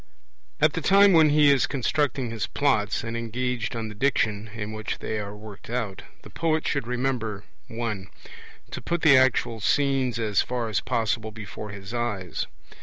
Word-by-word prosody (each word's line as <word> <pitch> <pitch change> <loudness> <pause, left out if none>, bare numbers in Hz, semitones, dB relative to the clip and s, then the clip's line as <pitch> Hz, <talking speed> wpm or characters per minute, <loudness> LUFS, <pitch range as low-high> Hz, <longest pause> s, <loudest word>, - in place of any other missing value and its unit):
17 - - +7
At 150 - +3
the 165 - -2
time 195 +3 +6
when 160 -2 +6
he 145 -1 +6
is 140 -3 +3
constructing 135 -2 0
his 110 -3 -2
Plots, 125 -7 +1
and 115 0 -4
engaged 120 +1 -2
on 115 -1 -3
the 105 - -7
Diction 110 -3 0
in 105 -1 -4
which 110 0 -4
they 110 - -3
are 100 0 -6
worked 105 -1 -11
out, 115 -6 -3 0.2
the - - -12
poet 160 -1 0
should 140 -5 -1
remember 120 -5 -2 0.2
(1) 110 -4 -4 0.6
to - - -5
put 170 -1 -2
the 150 -3 +8
actual 125 -3 +3
scenes 135 0 +1
as 105 -3 +2
far 120 -2 -2
as 110 - 0
possible 110 0 -1
before 105 -1 -8
his 100 +1 -8
eyes. 105 -7 -2
115 Hz, 180 wpm, -25 LUFS, 110-135 Hz, 0.6 s, the